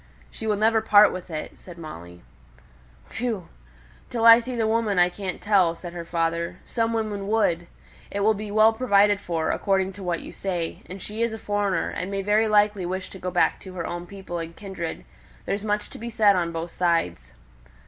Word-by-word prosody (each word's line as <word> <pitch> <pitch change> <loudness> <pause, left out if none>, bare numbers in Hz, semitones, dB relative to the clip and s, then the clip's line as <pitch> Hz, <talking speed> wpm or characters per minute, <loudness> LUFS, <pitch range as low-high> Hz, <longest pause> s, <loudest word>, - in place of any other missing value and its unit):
"She 220 - -6
will 210 - +2
never 220 +2 +3
part 210 -1 +6
with 185 0 -7
it," 155 -2 -6
said 175 -2 -12
Molly. 85 - -10 1.0
"Whew! 220 -8 -2 0.6
Till 230 -2 -1
I 230 0 +10
see 250 +1 -5
the 230 -2 +1
woman 220 -3 +1
I 175 0 +5
can't 185 0 -5
tell," 190 -5 +3
said 175 0 -9
her 175 -1 -5
father; 170 +1 -1
"some 230 -1 -1
women 215 -3 -2
would. 175 -6 +1 0.4
It 200 - -3
will 215 +2 +4
be 210 0 -6
well 215 +2 +5
provided 205 -4 +3
for, 165 -2 -1
according 195 -1 0
to 195 +1 -10
what 175 -2 -1
you - - -10
say. 175 -4 -3
And 190 +2 -8
she 210 +4 -6
is 230 -1 +1
a - - -4
foreigner, 205 -5 -1
and 180 - -4
may 195 0 -2
very 210 +2 +3
likely 210 -2 +3
wish 185 +2 -4
to 190 - -10
go 180 - -3
back 180 -1 +2
to 190 - -11
her 170 -2 -3
own 175 0 -5
people 190 -3 -6
and 165 0 -6
kindred. 190 -5 -6 0.4
There's 200 +1 -2
much 210 -1 -1
to - - -10
be 235 +1 -5
said 215 -3 +4
on 170 -2 0
both 165 +1 -5
sides." 90 - -1
195 Hz, 205 wpm, -25 LUFS, 175-215 Hz, 1.0 s, I